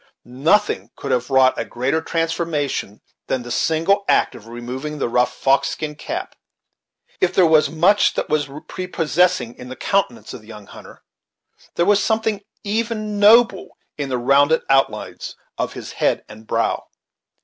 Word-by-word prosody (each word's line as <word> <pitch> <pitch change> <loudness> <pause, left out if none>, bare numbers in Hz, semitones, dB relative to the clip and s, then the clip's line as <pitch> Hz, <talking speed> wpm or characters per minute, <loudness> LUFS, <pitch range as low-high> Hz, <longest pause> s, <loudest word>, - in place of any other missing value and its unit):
Nothing 150 - +1
could - - -5
have 125 +1 0
wrought 130 -1 +4
a - - 0
greater 130 +6 -1
transformation 165 - -2 0.3
than 130 -2 -1
the 120 - -8
single 165 +9 +1
act - - +3
of 110 - -13
removing 125 +6 -6
the 140 - -1
rough 125 +1 +1
fox 135 +2 +2
skin 150 +1 -4
cap. 325 - -6 0.8
If 185 0 +1
there 185 - +6
was 155 -2 +4
much 180 +6 +3
that - - -2
was 145 -2 0 0.2
prepossessing 180 -5 0
in 125 - -9
the 130 - -7
countenance 195 - -1
of - - -9
the 110 - -20
young 105 -2 -11
hunter, - - -14 0.7
there 170 - +2
was 205 +1 +3
something 220 -2 0 0.2
even 215 -1 -2
noble 230 +4 +4 0.2
in 140 -2 -4
the 130 - -1
rounded 140 +5 +3
outlines 135 0 0 0.2
of - - -2
his - - -8
head - - 0
and 110 +1 -14
brow. 115 0 -1
155 Hz, 160 wpm, -20 LUFS, 125-195 Hz, 0.8 s, there